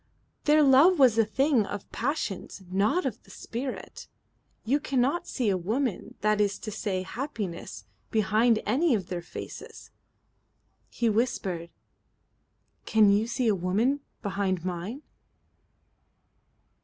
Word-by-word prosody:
"Their 300 Hz, 0 st, +5 dB
love 285 Hz, +7 st, +6 dB
was 255 Hz, -6 st, +6 dB
a -, -, +7 dB
thing 265 Hz, +1 st, +2 dB
of 205 Hz, -1 st, -5 dB
the -, -, -38 dB
passions, 230 Hz, -, -3 dB
not 210 Hz, -, +2 dB
of 235 Hz, -4 st, -3 dB
the -, -, -22 dB
spirit. 250 Hz, +3 st, -6 dB, 0.6 s
You 270 Hz, +6 st, +2 dB
cannot 275 Hz, +3 st, 0 dB
see 250 Hz, -4 st, -2 dB
a 190 Hz, -, +2 dB
woman, 225 Hz, +4 st, -2 dB
that 215 Hz, 0 st, +2 dB
is 200 Hz, -1 st, +1 dB
to 215 Hz, -, -5 dB
say 195 Hz, -3 st, -2 dB
happiness, 195 Hz, -, -5 dB, 0.2 s
behind 220 Hz, +2 st, +2 dB
any 270 Hz, +5 st, +2 dB
of 190 Hz, -4 st, -4 dB
their 175 Hz, -1 st, -3 dB
faces." 170 Hz, -, -9 dB, 1.0 s
He 235 Hz, -, -1 dB
whispered: 200 Hz, -7 st, -1 dB, 1.2 s
"Can 215 Hz, -2 st, +5 dB
you 210 Hz, +3 st, +2 dB
see 240 Hz, 0 st, -1 dB
a 215 Hz, -, +4 dB
woman 205 Hz, +10 st, +1 dB, 0.2 s
behind 190 Hz, -3 st, -1 dB
mine." 185 Hz, -, -4 dB
220 Hz, 130 wpm, -27 LUFS, 195-265 Hz, 1.2 s, a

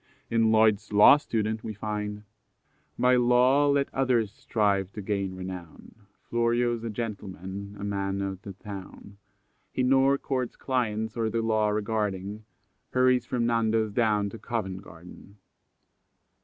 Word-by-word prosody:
In 115 Hz, -1 st, +3 dB
Lloyd's 110 Hz, -1 st, +3 dB
Law 105 Hz, +7 st, +8 dB
Student 110 Hz, -5 st, -2 dB
we 110 Hz, -, -5 dB
find: 105 Hz, 0 st, -4 dB, 0.7 s
"By 125 Hz, 0 st, +4 dB
law 125 Hz, +4 st, +4 dB
let 140 Hz, -1 st, +1 dB
others 125 Hz, -6 st, +1 dB
strive 100 Hz, -3 st, 0 dB
to 105 Hz, -, -6 dB
gain 100 Hz, -2 st, -2 dB
renown! 90 Hz, -3 st, -8 dB, 0.3 s
Florio's 120 Hz, 0 st, 0 dB
a 115 Hz, -, -3 dB
gentleman, 100 Hz, -3 st, -6 dB
a -, -, -6 dB
man 100 Hz, -1 st, -2 dB
o' 100 Hz, 0 st, -2 dB
th' 95 Hz, 0 st, -10 dB
town. 100 Hz, 0 st, -10 dB, 0.5 s
He 130 Hz, -, -1 dB
nor 135 Hz, +2 st, +4 dB
courts 130 Hz, -3 st, -3 dB
clients, 110 Hz, -4 st, -2 dB
or 115 Hz, -2 st, 0 dB
the 115 Hz, 0 st, -1 dB
law 110 Hz, -1 st, +2 dB
regarding, 105 Hz, -1 st, -2 dB, 0.4 s
Hurries 125 Hz, -1 st, +2 dB
from 120 Hz, -2 st, 0 dB
Nando's 115 Hz, -2 st, +1 dB
down 105 Hz, -2 st, +1 dB
to 115 Hz, -, -9 dB
Covent 95 Hz, -6 st, -4 dB
Garden. 90 Hz, +3 st, -14 dB
110 Hz, 135 wpm, -27 LUFS, 100-120 Hz, 0.7 s, Law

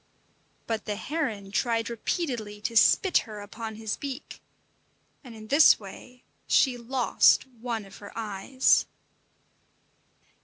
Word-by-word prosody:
But 225 Hz, -1 st, -3 dB
the 210 Hz, -, -3 dB
heron 220 Hz, -7 st, -4 dB
tried 230 Hz, +1 st, 0 dB
repeatedly 235 Hz, -, -3 dB
to 230 Hz, -, -3 dB
spit 365 Hz, -, +5 dB
her 215 Hz, -3 st, -8 dB
upon 220 Hz, +2 st, -7 dB
his 220 Hz, -1 st, -4 dB
beak, 275 Hz, 0 st, -7 dB, 0.8 s
and 245 Hz, -4 st, -11 dB
in 215 Hz, -1 st, -11 dB
this 295 Hz, +3 st, +6 dB
way 245 Hz, +5 st, -12 dB, 0.2 s
she 260 Hz, -3 st, +3 dB
lost 245 Hz, +1 st, +3 dB
one 235 Hz, -4 st, -6 dB
of 195 Hz, -, -14 dB
her 205 Hz, -, -11 dB
eyes. 225 Hz, +4 st, +1 dB
230 Hz, 120 wpm, -27 LUFS, 210-255 Hz, 0.8 s, this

